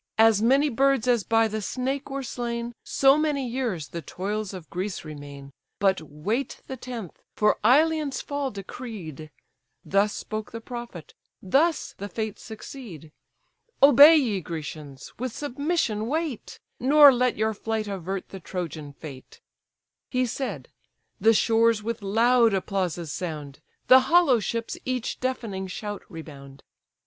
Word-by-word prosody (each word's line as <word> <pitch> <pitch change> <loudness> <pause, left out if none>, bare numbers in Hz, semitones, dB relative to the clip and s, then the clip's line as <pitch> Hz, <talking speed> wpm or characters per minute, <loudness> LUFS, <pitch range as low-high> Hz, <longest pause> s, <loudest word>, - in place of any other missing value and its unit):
As 220 -2 +5
many 270 +6 +4
birds 270 -1 +2
as 240 -4 +3
by 225 +4 +3
the 215 0 -4
snake 265 +7 -3
were 275 0 -4
slain, 235 -1 -4
So 275 +2 +4
many 290 -4 0
years 230 - -3
the 170 +4 -5
toils 200 +6 -4
of 180 -5 -9
Greece 185 0 -4
remain; 145 -2 -9 0.3
But 190 -3 +2
wait 160 - -3
the 265 - -6
tenth, 240 -7 -8
for 210 0 +2
Ilion's 300 +4 +3
fall 285 -1 -3
decreed:' 195 - -8 0.6
Thus 200 +2 +2
spoke 215 0 -5
the 230 - -6
prophet, 235 -8 -8 0.3
thus 305 - +1
the 200 +1 -5
Fates 215 +1 -4
succeed. 215 - -10 0.7
Obey, 290 +3 +9
ye 230 -11 +1
Grecians! 150 -4 -8
with 255 -1 -3
submission 285 -6 -1
wait, 310 -3 -3 0.2
Nor 285 +2 +8
let 250 0 +1
your 220 +1 +1
flight 220 0 -3
avert 195 -1 -4
the 195 - -8
Trojan 165 -5 -6
fate." 140 -3 -11 0.7
He 255 0 +1
said: 220 - -4 0.5
the 225 +3 +5
shores 225 -1 +3
with 230 0 -3
loud 230 +2 +3
applauses 180 -4 -2
sound, 150 -6 -5 0.3
The 260 - +8
hollow 275 -2 +4
ships 230 +2 -3
each 255 -2 -3
deafening 225 -7 -3
shout 205 +2 -5
rebound. 140 -5 -11
220 Hz, 135 wpm, -25 LUFS, 185-255 Hz, 0.7 s, Obey